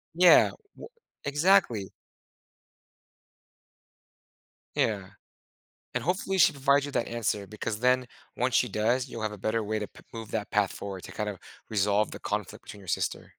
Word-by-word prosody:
Yeah, 180 0 +7 0.3
wo - - -9 0.4
exactly. 145 - +3 2.8
Yeah. 100 -4 0 0.9
And, - - -1
hopefully, 190 +2 0
she 180 - +6
provides 140 0 +3
you 145 - -5
that 115 - 0
answer 110 -3 -1
because 105 +1 -4
then, 125 +1 +3 0.3
once - - 0
she - - +4
does, 120 +4 +1
you'll 115 - -6
have 110 -1 -1
a 105 - -8
better 110 +3 -1
way 110 +1 -1
to 105 - -3
pe - - -17
move 115 -2 -7
that 105 -2 -2
path 100 -2 +2
forward 95 -2 -7
to - - -9
kind 105 -1 -2
of 100 - -8 0.3
resolve 105 0 +2
the - - -7
conflict 105 -2 -4
between 105 - -10
your 95 - -14
sister. - - -1
110 Hz, 160 wpm, -28 LUFS, 105-130 Hz, 2.8 s, Yeah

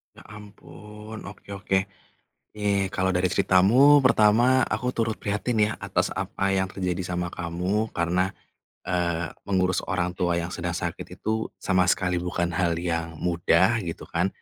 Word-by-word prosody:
Ya - - -14
ampun, 105 +1 -11
oke 100 0 -11
oke. 95 -1 0 0.8
Nih 100 -2 0
kalau 95 0 +1
dari 90 0 +1
ceritamu, 120 +13 +5
pertama 120 +1 +4
aku 125 - -2
turut 110 -1 -1
prihatin 105 +3 -1
ya - - -3
atas - - -1
apa 95 - -2
yang 95 0 -1
terjadi 90 -1 -2
sama 90 0 -2
kamu 90 +6 -2
karena, 90 +2 0 0.5
eee, 85 -2 -1 0.2
mengurus 95 -2 +1
orang 90 -1 -1
tua 85 -1 0
yang 85 +1 -3
sedang - - -3
sakit - - -5
itu 110 0 -2
sama 95 -1 +1
sekali 90 -1 +1
bukan 85 -1 -2
hal 85 0 0
yang 85 -1 -3
mudah 90 +6 +2
gitu 85 -5 -6
kan. 85 +3 0
95 Hz, 150 wpm, -25 LUFS, 90-105 Hz, 0.8 s, ceritamu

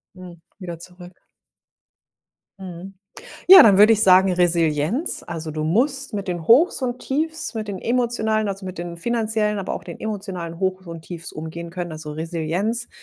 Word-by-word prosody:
Hm, 180 -2 -12 0.2
wieder 175 -3 -7
zurück. 180 +1 -14 1.4
Mhm. 185 +1 -9 0.5
Ja, 380 0 +11
dann 200 -4 +5
würde 210 +2 +7
ich 215 -1 +2
sagen 190 -1 +5
Resilienz, 170 - 0
also, 165 -2 -6
du 155 0 -4
musst 265 - 0
mit 200 -1 -4
den 175 -3 -4
Hochs 275 +4 +4
und 250 0 -2
Tiefs, 315 +2 -3
mit 215 -2 -5
den 195 - -4
emotionalen, 225 -3 0
also, 195 0 -5
mit 185 -1 -8
den 175 0 -6
finanziellen, 220 0 -1
aber 185 - -4
auch - - -8
den 170 - -10
emotionalen 190 -6 -5
Hochs 190 -1 -2
und 165 -1 -8
Tiefs 170 0 -8
umgehen 165 +2 -8
können, 175 -2 -6
also, 155 -1 -8
Resilienz. 170 +9 -3
185 Hz, 165 wpm, -21 LUFS, 170-220 Hz, 1.4 s, Ja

